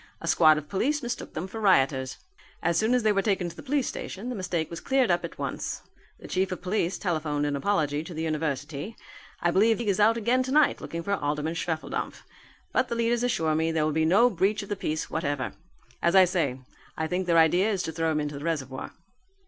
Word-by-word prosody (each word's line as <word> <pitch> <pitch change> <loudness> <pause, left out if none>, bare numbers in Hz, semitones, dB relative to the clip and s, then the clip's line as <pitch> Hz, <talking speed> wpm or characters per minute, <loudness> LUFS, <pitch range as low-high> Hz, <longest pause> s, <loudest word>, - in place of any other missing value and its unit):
A 165 - -7
squad 155 -2 +6
of 150 -1 -5
police 280 - 0
mistook 240 +1 -5
them 155 - -2
for 220 +3 -7
rioters. 135 -9 +2 0.5
As 170 0 +2
soon 220 +8 +3
as 250 - +1
they 215 - +4
were 200 -1 +2
taken 195 -4 0
to - - -12
the - - -9
police 280 -1 0
station, 215 +6 -5
the 250 - -3
mistake 175 -5 -2
was 170 - -5
cleared 265 -6 +2
up 175 - +1
at - - -7
once. - - -4 0.4
The - - -10
chief 190 +1 0
of 180 - -5
police 185 -1 0
telephoned 155 -5 -1
an 145 -1 -1
apology 150 -2 0
to 175 - -8
the 160 - -3
university. 150 - -3 0.5
I 175 - +2
believe 215 +4 +4
the 235 - -3
league 210 - -1
is 195 - -2
out 220 +2 +5
again 235 +3 +2
tonight 275 +4 +3
looking 170 0 -5
for 200 - -1
Alderman 150 -2 -1
Schwefeldampf. 165 -1 -3 0.5
But 255 - +2
the 235 - -3
leaders 235 0 +1
assure 165 -11 +1
me 160 +1 +1
there 160 -1 +1
will 155 - +1
be 160 +1 +2
no 215 +9 +5
breach 200 +3 +1
of 200 - -11
the 205 - -1
peace 155 -4 -3
whatever. 145 -4 -2 0.5
As 170 +2 +2
I 190 -1 +8
say, 160 -8 -1 0.4
I 160 - -1
think 180 +3 -2
their 170 -1 +4
idea 175 +6 +4
is 195 -3 -1
to 160 - -3
throw 165 0 0
him 155 - 0
into 145 -1 -3
the - - -9
reservoir." 135 -6 -3
175 Hz, 230 wpm, -27 LUFS, 155-210 Hz, 0.5 s, I